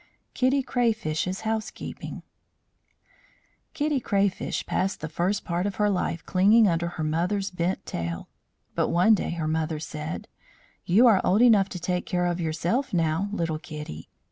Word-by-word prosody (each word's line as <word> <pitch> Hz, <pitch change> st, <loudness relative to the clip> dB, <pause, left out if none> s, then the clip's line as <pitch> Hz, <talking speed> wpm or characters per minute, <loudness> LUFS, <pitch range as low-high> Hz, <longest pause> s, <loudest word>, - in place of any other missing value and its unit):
KITTY 260 Hz, +2 st, +2 dB
CRAYFISH'S 215 Hz, -8 st, -1 dB
HOUSEKEEPING 220 Hz, 0 st, -4 dB, 1.5 s
Kitty 295 Hz, -2 st, +1 dB
Crayfish 200 Hz, -4 st, 0 dB
passed 190 Hz, +1 st, -1 dB
the 155 Hz, -, -4 dB
first 175 Hz, +5 st, -1 dB
part 175 Hz, +3 st, -1 dB
of 200 Hz, -, -4 dB
her 210 Hz, -1 st, +2 dB
life 175 Hz, -3 st, -2 dB
clinging 205 Hz, +4 st, +5 dB
under 170 Hz, -1 st, +1 dB
her 160 Hz, -, -2 dB
mother's 180 Hz, +6 st, 0 dB
bent 180 Hz, +1 st, -2 dB
tail. 85 Hz, 0 st, -4 dB, 0.5 s
But -, -, +1 dB
one 180 Hz, +6 st, +5 dB
day 205 Hz, -, 0 dB
her 165 Hz, -2 st, -2 dB
mother 160 Hz, 0 st, -1 dB
said: 155 Hz, +1 st, -6 dB, 0.6 s
"You 205 Hz, +8 st, +5 dB
are 220 Hz, -6 st, +6 dB
old 205 Hz, +6 st, +4 dB
enough 210 Hz, -5 st, +5 dB
to 180 Hz, -, -6 dB
take 180 Hz, +1 st, -2 dB
care 180 Hz, 0 st, 0 dB
of 175 Hz, 0 st, -1 dB
yourself 175 Hz, -, -1 dB
now, 165 Hz, +4 st, +1 dB
little 165 Hz, -6 st, -2 dB
Kitty. 150 Hz, -, -8 dB
180 Hz, 150 wpm, -26 LUFS, 165-210 Hz, 1.5 s, are